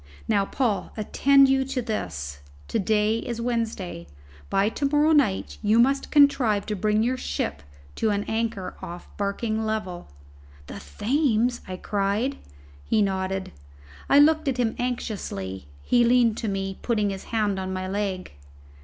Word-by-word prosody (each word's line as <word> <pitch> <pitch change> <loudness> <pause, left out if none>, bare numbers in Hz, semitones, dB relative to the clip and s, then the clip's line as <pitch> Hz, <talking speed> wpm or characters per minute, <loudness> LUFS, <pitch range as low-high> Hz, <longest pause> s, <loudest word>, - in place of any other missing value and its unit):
Now, 205 -3 +2
Paul, 220 -5 -1
attend 275 +6 +4
you 270 0 +3
to 270 0 -3
this. 70 - -4 0.3
To 225 - 0
day 215 +2 +2
is 235 -1 -5
Wednesday; 225 - -3 0.4
by 195 +1 +2
to 280 +5 -3
morrow 295 +2 +3
night 265 -11 +1
you 215 +1 +3
must 270 +4 +3
contrive 260 -8 +4
to 210 - -2
bring 210 +2 +1
your 255 +2 0
ship 70 - -3 0.4
to 220 - +1
an 205 -1 0
anchor 220 -4 -2
off 175 +1 -8
Barking 215 +2 -2
Level." 210 -5 -3 0.6
"The - - -8 0.2
Thames!" 245 -2 +1
I 185 -1 -5
cried. 205 +8 -1 0.4
He 215 -2 +2
nodded. 190 -1 -2 0.6
I 280 - +6
looked 310 +1 +5
at 265 -2 0
him 235 -3 0
anxiously. 145 - -4 0.2
He 240 -1 +3
leaned 235 -2 +4
to 225 - -3
me, 195 -1 -3
putting 210 -4 0
his 190 -1 -7
hand 210 -4 0
on 190 0 -4
my 185 0 -3
leg. 195 -1 -3
215 Hz, 155 wpm, -25 LUFS, 195-245 Hz, 0.6 s, I